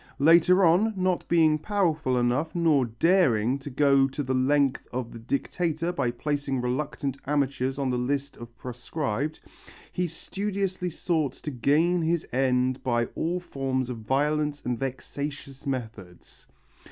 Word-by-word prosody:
Later 170 Hz, +5 st, +5 dB
on, 200 Hz, +7 st, +3 dB
not 185 Hz, -1 st, 0 dB
being 160 Hz, -2 st, +4 dB
powerful 160 Hz, -9 st, 0 dB
enough 125 Hz, +7 st, 0 dB
nor 160 Hz, -6 st, +3 dB
daring 125 Hz, -, +2 dB
to 140 Hz, -, -8 dB
go 140 Hz, 0 st, +4 dB
to 140 Hz, +2 st, -4 dB
the 130 Hz, 0 st, -1 dB
length 135 Hz, +1 st, +2 dB
of 125 Hz, -2 st, -4 dB
the 115 Hz, -, -9 dB
Dictator 165 Hz, +7 st, -1 dB
by 135 Hz, -9 st, 0 dB
placing 140 Hz, +2 st, -2 dB
reluctant 135 Hz, +2 st, -2 dB
amateurs 135 Hz, -2 st, 0 dB
on 135 Hz, -2 st, 0 dB
the 125 Hz, -, 0 dB
list 140 Hz, +3 st, -2 dB
of 115 Hz, 0 st, -11 dB
proscribed, 130 Hz, +3 st, -3 dB, 0.5 s
he 180 Hz, 0 st, -1 dB
studiously 190 Hz, +2 st, -3 dB
sought 160 Hz, -5 st, -1 dB
to 150 Hz, -, -7 dB
gain 155 Hz, +7 st, +2 dB
his 165 Hz, 0 st, 0 dB
end 130 Hz, 0 st, +1 dB
by 120 Hz, -2 st, +1 dB
all 175 Hz, +3 st, -1 dB
forms 135 Hz, -6 st, -2 dB
of 120 Hz, -, -5 dB
violence 145 Hz, +5 st, 0 dB
and 125 Hz, -2 st, -1 dB
vexatious 135 Hz, +1 st, -5 dB
methods. 110 Hz, -9 st, -7 dB
140 Hz, 140 wpm, -26 LUFS, 125-165 Hz, 0.5 s, Later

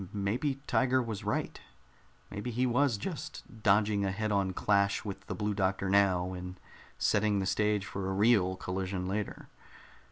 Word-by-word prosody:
Maybe 105 Hz, +8 st, -1 dB
Tiger 130 Hz, -2 st, +2 dB
was 115 Hz, -4 st, -4 dB
right. 135 Hz, +9 st, -2 dB, 0.7 s
Maybe 105 Hz, +4 st, -4 dB
he 125 Hz, +2 st, 0 dB
was 125 Hz, -1 st, +2 dB
just 120 Hz, -, -7 dB
dodging 105 Hz, 0 st, +3 dB
a 100 Hz, -, +1 dB
head 110 Hz, +3 st, -2 dB
on 100 Hz, -2 st, +1 dB
clash 100 Hz, +2 st, +1 dB
with 100 Hz, -2 st, -6 dB
the -, -, -3 dB
Blue 105 Hz, 0 st, -1 dB
Doctor 95 Hz, -1 st, 0 dB
now 95 Hz, -2 st, +3 dB
and 90 Hz, 0 st, -7 dB, 0.4 s
setting 105 Hz, -1 st, +2 dB
the 95 Hz, -, 0 dB
stage 105 Hz, +1 st, +1 dB
for 95 Hz, -1 st, -4 dB
a -, -, -1 dB
real 100 Hz, -2 st, +3 dB
collision 90 Hz, 0 st, -3 dB
later. 105 Hz, +1 st, -4 dB
100 Hz, 160 wpm, -31 LUFS, 95-110 Hz, 0.7 s, dodging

